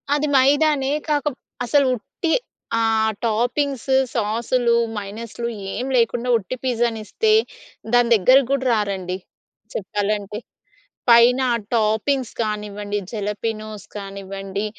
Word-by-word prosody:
అది 295 Hz, +1 st, 0 dB
మైదానే. 280 Hz, +1 st, +3 dB, 0.2 s
కాకప్ 290 Hz, -2 st, 0 dB, 0.3 s
అసలు 280 Hz, +3 st, +3 dB
ఉట్టి 320 Hz, -, -4 dB, 0.5 s
ఆహ్, 220 Hz, -1 st, +2 dB
టాపింగ్స్ 245 Hz, +4 st, 0 dB, 0.2 s
సాసులు, 235 Hz, +2 st, +1 dB, 0.2 s
మైనీస్‌లూ 220 Hz, +3 st, -5 dB, 0.3 s
ఏం 250 Hz, -, -3 dB
లేకుండా 240 Hz, +1 st, +1 dB
ఉట్టి 220 Hz, +3 st, -5 dB
పిజ్జాని 235 Hz, -3 st, 0 dB
ఇస్తే 435 Hz, -, +1 dB, 0.6 s
దాని 245 Hz, -1 st, +5 dB
దగ్గరకి 255 Hz, +6 st, +5 dB
కూడా 275 Hz, -1 st, 0 dB
రారండి. 195 Hz, -4 st, -1 dB, 0.6 s
చెప్పాలంటే. 205 Hz, +1 st, -2 dB, 0.7 s
పైన 235 Hz, +2 st, +7 dB, 0.3 s
టాపింగ్స్ 225 Hz, +4 st, +1 dB
కానివ్వండి, 210 Hz, -1 st, -3 dB
జలపనోస్ 215 Hz, -1 st, -4 dB
కానివ్వండి, 195 Hz, 0 st, -5 dB
225 Hz, 95 wpm, -21 LUFS, 210-255 Hz, 0.7 s, పైన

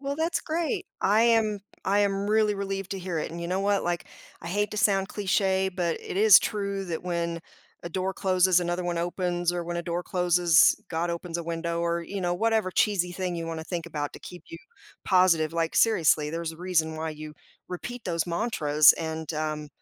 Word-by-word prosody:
Well, 280 Hz, 0 st, -3 dB
that's 325 Hz, +2 st, 0 dB
great. 320 Hz, -1 st, -2 dB
I 210 Hz, +3 st, +3 dB
am 225 Hz, -3 st, +2 dB, 0.2 s
I 200 Hz, +2 st, +2 dB
am 200 Hz, 0 st, 0 dB
really 215 Hz, -1 st, +3 dB
relieved 195 Hz, -1 st, -4 dB
to 195 Hz, -, -4 dB
hear 180 Hz, -3 st, -3 dB
it. -, -, -3 dB
And 170 Hz, +1 st, -7 dB
you 170 Hz, -, -4 dB
know 185 Hz, +2 st, -1 dB
what, 200 Hz, 0 st, +1 dB
like, 175 Hz, 0 st, -2 dB, 0.3 s
I 170 Hz, -, -7 dB
hate 205 Hz, +3 st, -1 dB
to -, -, -5 dB
sound 195 Hz, -2 st, +2 dB
cliché, 190 Hz, -2 st, 0 dB
but 175 Hz, -3 st, -1 dB
it -, -, -7 dB
is 210 Hz, 0 st, +8 dB
true 200 Hz, -2 st, -3 dB
that 165 Hz, -2 st, -4 dB
when 170 Hz, -1 st, -2 dB, 0.4 s
a 170 Hz, -, -6 dB
door 190 Hz, +2 st, -2 dB
closes, 185 Hz, -1 st, +3 dB
another 175 Hz, +1 st, -2 dB
one 175 Hz, -1 st, -2 dB
opens 175 Hz, 0 st, -1 dB
or 175 Hz, -1 st, -2 dB
when 175 Hz, 0 st, -4 dB
a 170 Hz, -, -2 dB
door 175 Hz, 0 st, -3 dB
closes, 180 Hz, -1 st, +4 dB
God 170 Hz, +1 st, -2 dB
opens 170 Hz, 0 st, -4 dB
a 170 Hz, -, -4 dB
window 170 Hz, 0 st, -3 dB
or, 170 Hz, 0 st, -1 dB
you 195 Hz, +4 st, -6 dB
know, 175 Hz, 0 st, 0 dB
whatever 220 Hz, -1 st, +1 dB
cheesy 180 Hz, -2 st, +1 dB
thing 180 Hz, 0 st, -3 dB
you 165 Hz, -1 st, -4 dB
wanna 165 Hz, -1 st, -5 dB
think 170 Hz, -1 st, -4 dB
about 150 Hz, -3 st, -4 dB
to -, -, -9 dB
keep 180 Hz, -, -11 dB
you 330 Hz, -, -8 dB, 0.5 s
positive. 170 Hz, -4 st, +3 dB
Like, 165 Hz, -1 st, -1 dB
seriously, 155 Hz, -8 st, +3 dB
there's 165 Hz, 0 st, -4 dB
a -, -, -13 dB
reason 165 Hz, -3 st, 0 dB
why 160 Hz, 0 st, -3 dB
you 155 Hz, 0 st, -9 dB, 0.3 s
repeat 235 Hz, +7 st, -7 dB
those 170 Hz, -2 st, -1 dB
mantras. 160 Hz, -6 st, +4 dB
And, 160 Hz, -1 st, -5 dB
um, 155 Hz, -1 st, -3 dB
175 Hz, 210 wpm, -26 LUFS, 170-195 Hz, 0.5 s, is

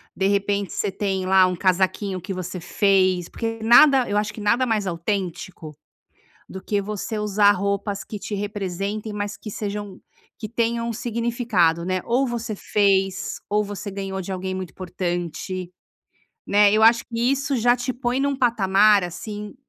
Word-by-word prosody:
De 190 Hz, -, -1 dB
repente 200 Hz, 0 st, 0 dB
você 205 Hz, -, -1 dB
tem 190 Hz, -1 st, -2 dB
lá 190 Hz, 0 st, +5 dB
um 180 Hz, -, -2 dB
casaquinho 190 Hz, +1 st, 0 dB
que 190 Hz, +3 st, -5 dB
você 185 Hz, 0 st, -5 dB
fez, 185 Hz, -1 st, +2 dB
porque 225 Hz, -1 st, -4 dB
nada 255 Hz, +3 st, +6 dB
eu 205 Hz, -, 0 dB
acho 210 Hz, 0 st, -1 dB
que -, -, -10 dB
nada 235 Hz, +5 st, +2 dB
mais 215 Hz, -5 st, 0 dB
autêntico, 170 Hz, -3 st, -4 dB, 0.7 s
do 190 Hz, -, -8 dB
que 205 Hz, -1 st, -1 dB
você 210 Hz, +2 st, -4 dB
usar 205 Hz, -1 st, +4 dB
roupas 200 Hz, +1 st, -2 dB
que 210 Hz, -, -7 dB
te 205 Hz, +2 st, -5 dB
representem, 205 Hz, +1 st, -4 dB
mas 205 Hz, 0 st, -4 dB
que 215 Hz, -, -9 dB
sejam 205 Hz, -2 st, -5 dB, 0.4 s
que 215 Hz, -, -6 dB
tenham 235 Hz, 0 st, -1 dB
significado, 230 Hz, -8 st, 0 dB
né? 185 Hz, +1 st, -1 dB
Ou 255 Hz, +3 st, +1 dB
você 235 Hz, -2 st, -4 dB
fez 195 Hz, -2 st, +1 dB
ou 210 Hz, +1 st, +2 dB
você 205 Hz, 0 st, -6 dB
ganhou 195 Hz, -1 st, -4 dB
de 190 Hz, -, -6 dB
alguém 185 Hz, 0 st, -4 dB
muito 185 Hz, -2 st, -5 dB
importante, 180 Hz, 0 st, -4 dB, 0.8 s
né, 205 Hz, 0 st, +5 dB
eu 215 Hz, +1 st, +3 dB
acho 230 Hz, +1 st, +5 dB
que 230 Hz, -1 st, -6 dB
isso 275 Hz, +3 st, +1 dB
já 240 Hz, +1 st, +4 dB
te 245 Hz, +1 st, -3 dB
põe 250 Hz, +1 st, -1 dB
num 280 Hz, 0 st, 0 dB
patamar, 210 Hz, -4 st, +4 dB
assim, 205 Hz, +4 st, -7 dB
205 Hz, 165 wpm, -23 LUFS, 190-225 Hz, 0.8 s, nada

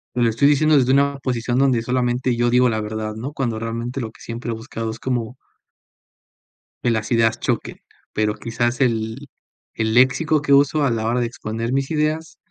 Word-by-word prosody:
te 120 Hz, -, 0 dB
lo 115 Hz, -, +4 dB
estoy 115 Hz, +6 st, +3 dB
diciendo 155 Hz, +1 st, +4 dB
desde 130 Hz, -1 st, +3 dB
una 140 Hz, +1 st, +2 dB
posición 120 Hz, -2 st, -1 dB
donde 130 Hz, -3 st, +3 dB
solamente 125 Hz, 0 st, 0 dB
yo 120 Hz, +1 st, +1 dB
digo 125 Hz, +1 st, +4 dB
la 110 Hz, -2 st, 0 dB
verdad, 110 Hz, 0 st, -4 dB
¿no? 125 Hz, +6 st, -5 dB
Cuando 120 Hz, -6 st, -2 dB
realmente 115 Hz, +3 st, -4 dB
lo 110 Hz, -2 st, -5 dB
que -, -, -21 dB
siempre 115 Hz, 0 st, -5 dB
he -, -, -1 dB
buscado 115 Hz, 0 st, -5 dB
es 115 Hz, -, -9 dB
como 125 Hz, -1 st, -3 dB, 1.5 s
que 120 Hz, -, +2 dB
las 110 Hz, 0 st, -2 dB
ideas 115 Hz, -1 st, +2 dB
choquen, -, -, -2 dB, 0.4 s
pero 105 Hz, 0 st, 0 dB
quizás 120 Hz, +3 st, -2 dB
el 115 Hz, +2 st, -1 dB, 0.5 s
el 110 Hz, 0 st, -1 dB
léxico 130 Hz, +5 st, +3 dB
que 145 Hz, -1 st, -2 dB
uso 145 Hz, +2 st, +4 dB
a 135 Hz, -, +2 dB
la 110 Hz, -1 st, -1 dB
hora 120 Hz, +1 st, +1 dB
de -, -, +1 dB
exponer 115 Hz, -1 st, -4 dB
mis 135 Hz, +1 st, -1 dB
ideas, 155 Hz, +1 st, -1 dB
120 Hz, 195 wpm, -21 LUFS, 115-135 Hz, 1.5 s, lo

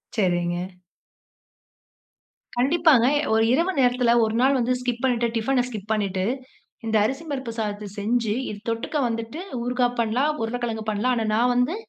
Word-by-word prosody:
சரிங்க. 175 Hz, -4 st, +1 dB, 2.0 s
கண்டிப்பாங்க, 280 Hz, -1 st, +4 dB
எ -, -, +1 dB
ஒரு 220 Hz, 0 st, +4 dB
இரவு 335 Hz, +7 st, +2 dB
நேரத்தில 245 Hz, -2 st, +3 dB
ஒரு 220 Hz, 0 st, 0 dB
நாள் 270 Hz, +2 st, +4 dB
வந்து 245 Hz, +1 st, +1 dB
ஸ்கிப் 245 Hz, 0 st, -3 dB
பண்ணிட்டு. 240 Hz, -2 st, +2 dB
டிஃபன 245 Hz, +3 st, +1 dB
ஸ்கிப் 215 Hz, -3 st, -6 dB
பண்ணிட்டு, 200 Hz, -3 st, 0 dB, 0.6 s
இந்த 220 Hz, 0 st, -1 dB
அரிசி 265 Hz, +8 st, -2 dB
பருப்பு 260 Hz, -4 st, -3 dB
சாதத்த 210 Hz, -1 st, -3 dB
செஞ்சு 225 Hz, +1 st, 0 dB, 0.2 s
இது 205 Hz, -, -6 dB
தொட்டுக்க 230 Hz, +6 st, -2 dB
வந்துட்டு, 230 Hz, +7 st, -4 dB, 0.2 s
ஊறுகாய் 245 Hz, 0 st, 0 dB
பண்ணலாம். 240 Hz, +6 st, +1 dB
உருளைக்கிழங்கு 225 Hz, -1 st, -3 dB
பண்ணலாம். 215 Hz, +4 st, +1 dB
ஆனா 225 Hz, -, 0 dB
நான் 245 Hz, +2 st, +3 dB
வந்து 250 Hz, +8 st, +1 dB
235 Hz, 145 wpm, -24 LUFS, 220-250 Hz, 2.0 s, கண்டிப்பாங்க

